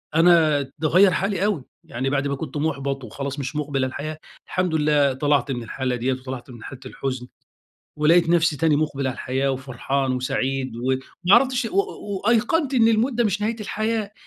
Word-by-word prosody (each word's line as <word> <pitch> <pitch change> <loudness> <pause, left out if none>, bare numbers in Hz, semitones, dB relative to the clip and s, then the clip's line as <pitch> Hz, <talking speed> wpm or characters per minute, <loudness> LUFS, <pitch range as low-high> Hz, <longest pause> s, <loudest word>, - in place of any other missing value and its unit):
أنا 165 -3 +5 0.2
ده 155 - +1
غيّر 185 +4 +6
حالي 195 +1 0
أوي، 205 -10 0 0.2
يعني 130 +3 -3
بعد 140 0 0
ما 140 - -1
كنت 145 0 -6
محبَط 140 -3 -2
وخلاص 140 +5 -5
مش 140 +2 -4
مقبِل 145 -2 -2
على - - -2
الحياة، 150 +3 -5 0.3
الحمد 180 -3 -1
لله 150 -2 +3
طلَعت 145 +1 +1
من 120 -2 -3
الحالة 130 +2 -2
دِيَّة 125 +2 0
وطلَعت 130 0 -7
من 120 -2 -11
حالة 135 - -9
الحُزن. 130 -1 -4 0.7
ولقيت 165 +3 +4
نفسي 170 -3 +3
تاني 155 +1 +2
مُقبِل 145 -3 -1
على 130 - -1
الحياة 135 +1 -1
وفرحان 135 +1 -2
وسعيد 130 0 -2
وما 130 +2 -1 0.3
عرفتش 255 0 +3
و 365 - -5
و 210 - -2
وأيقنْت 255 +6 +2
إن 230 -3 +5
الموت 230 +4 +2
ده 235 0 +1
مش 205 -1 0
نهاية 225 +2 0
الحياة، 215 0 -2
145 Hz, 185 wpm, -23 LUFS, 130-195 Hz, 0.7 s, غيّر